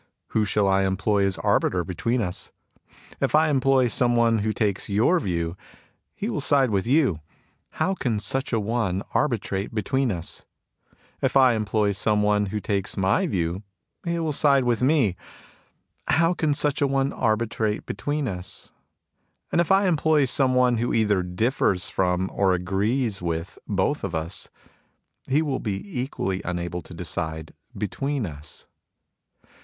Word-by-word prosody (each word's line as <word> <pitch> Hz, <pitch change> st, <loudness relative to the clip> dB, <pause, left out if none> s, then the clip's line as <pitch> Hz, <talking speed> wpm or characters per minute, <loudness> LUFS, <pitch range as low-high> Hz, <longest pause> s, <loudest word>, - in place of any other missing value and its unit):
Who 110 Hz, -1 st, +1 dB
shall 105 Hz, 0 st, +1 dB
I 95 Hz, 0 st, +3 dB
employ 100 Hz, +1 st, +1 dB
as 95 Hz, -, -2 dB
arbiter 90 Hz, -1 st, +1 dB
between 115 Hz, +8 st, -1 dB
us? 90 Hz, -2 st, -4 dB, 0.7 s
If -, -, +1 dB
I 155 Hz, 0 st, +4 dB
employ 135 Hz, -2 st, +3 dB
some 120 Hz, +1 st, +2 dB
one 115 Hz, -1 st, +3 dB
who 110 Hz, +1 st, 0 dB
takes 105 Hz, -3 st, -1 dB
your 115 Hz, -, +3 dB
view, 85 Hz, -, -2 dB, 0.6 s
he -, -, -3 dB
will -, -, -2 dB
side 135 Hz, -4 st, +3 dB
with 100 Hz, +1 st, 0 dB
you. 130 Hz, -, +3 dB, 0.5 s
How 190 Hz, -, 0 dB
can 120 Hz, -, -1 dB
such 130 Hz, +6 st, -1 dB
a 115 Hz, -, +2 dB
one 105 Hz, -3 st, -1 dB
arbi 140 Hz, -6 st, +2 dB
trate 95 Hz, +3 st, -4 dB
between 130 Hz, +3 st, 0 dB
us? 85 Hz, -3 st, -4 dB, 0.8 s
If -, -, +2 dB
I 130 Hz, -2 st, +6 dB
employ 105 Hz, -1 st, +1 dB
some 105 Hz, +1 st, +1 dB
one 105 Hz, 0 st, +2 dB
who 105 Hz, +2 st, -3 dB
takes 100 Hz, -1 st, -2 dB
my 95 Hz, -, +2 dB
view, 90 Hz, -, -1 dB, 0.4 s
he 170 Hz, -1 st, -1 dB
will 160 Hz, -2 st, -1 dB
side 140 Hz, -2 st, +4 dB
with 120 Hz, -1 st, +1 dB
me. 130 Hz, -, +3 dB, 0.9 s
How 165 Hz, +3 st, +3 dB
can 155 Hz, -4 st, 0 dB
such 145 Hz, -1 st, 0 dB
a 140 Hz, -, +4 dB
one 135 Hz, 0 st, 0 dB
arbitrate 110 Hz, -2 st, 0 dB
between 145 Hz, +7 st, -2 dB
us? 90 Hz, -4 st, -5 dB, 0.8 s
And -, -, +3 dB
if 170 Hz, -, -1 dB
I 195 Hz, 0 st, +4 dB
employ 155 Hz, -3 st, +3 dB
some 130 Hz, 0 st, +2 dB
one 125 Hz, -2 st, +3 dB
who 120 Hz, +2 st, 0 dB
either 105 Hz, -4 st, +2 dB
differs 90 Hz, 0 st, 0 dB
from 90 Hz, 0 st, +1 dB
or 95 Hz, -2 st, +2 dB
agrees 100 Hz, +4 st, -1 dB
with 85 Hz, 0 st, -4 dB
both 100 Hz, +9 st, 0 dB
of 95 Hz, -4 st, -3 dB
us, 80 Hz, +3 st, -3 dB, 0.8 s
he 145 Hz, +4 st, +2 dB
will 140 Hz, -4 st, -1 dB
be 120 Hz, -, -4 dB
equally 95 Hz, -7 st, -3 dB
unable 85 Hz, -1 st, -3 dB
to 85 Hz, -, -12 dB
decide 80 Hz, -2 st, -4 dB, 0.2 s
between 135 Hz, +5 st, -2 dB
us. 75 Hz, -3 st, -7 dB
110 Hz, 160 wpm, -24 LUFS, 95-135 Hz, 0.9 s, I